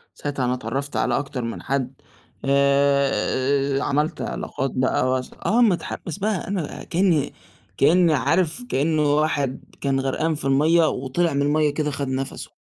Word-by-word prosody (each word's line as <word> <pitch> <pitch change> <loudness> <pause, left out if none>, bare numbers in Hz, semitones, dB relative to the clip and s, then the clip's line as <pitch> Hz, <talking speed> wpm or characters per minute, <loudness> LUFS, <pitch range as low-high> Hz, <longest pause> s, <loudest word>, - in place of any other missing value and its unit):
ساعتها 140 -3 -3
أنا 125 - +1
اتعرفت 135 +3 -4
على - - +1
أكتر 140 -3 -4
من 115 0 -5
حد، 135 -1 -3 0.4
آآ 140 0 +2
آآ، - - -2
عملت 150 +3 0
علاقات 135 0 -3
بقى 130 0 +1
واس 130 0 -1
آه 235 +4 +3
مُتحمس 175 -5 0
بقى 205 -2 -1
أنا 185 -6 -4
كأني 165 -5 +1 0.4
كأني 170 +3 +4
عارف 165 - +1
كأنّه 150 +1 +2
واحد 145 -4 0 0.2
كان 135 -1 +1
غرقان 155 +4 0
في 145 - -4
المَيّة، 155 +5 +4
وطلع 140 +6 -1
من 140 - 0
المَيّة 150 +1 +2
كده 150 0 -1
خد 140 -1 -3
نَفْسه، 130 0 -4
140 Hz, 150 wpm, -23 LUFS, 135-160 Hz, 0.4 s, كأني